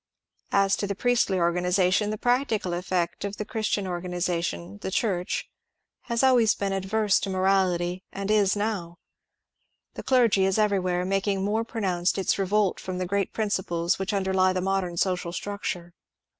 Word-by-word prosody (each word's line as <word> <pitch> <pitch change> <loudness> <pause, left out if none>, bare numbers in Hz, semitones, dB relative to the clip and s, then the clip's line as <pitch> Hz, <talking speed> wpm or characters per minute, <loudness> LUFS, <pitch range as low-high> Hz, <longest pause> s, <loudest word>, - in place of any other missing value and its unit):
As 195 0 +3
to 200 - -2
the 200 - -3
priestly 240 -4 +1
organization, 180 +3 +2
the 215 - -3
practical 245 -6 0
effect 175 0 -2
of 200 0 -4
the 210 - -4
Christian 215 -3 -1
organization, 175 - -3
^^ - - -37
the - - -3
Church," 190 -3 -1 0.6
has 235 0 0
always 245 -4 +5
been 195 -1 -2
adverse 195 +2 +1
to 200 - -4
moraUty^d 185 -2 +1 0.3
is 205 -2 +3
n^w. 205 -5 -2 1.0
The - - -6
dei^ 240 -6 +3
is 190 +1 +2
everfwhere 185 -4 +1
making 195 0 0
more 215 +3 0
pronounced 190 -6 -1
its 195 +1 0
revolt 195 0 +1
from 185 -1 -5
the 185 - -2
great 200 +1 -1
principles 185 -5 -1
which 195 +1 -2
underlie 190 -2 +2
the 185 - -1
modem 190 -2 -1
social 180 -1 0
structure. 180 -3 -5
190 Hz, 155 wpm, -26 LUFS, 180-205 Hz, 1.0 s, always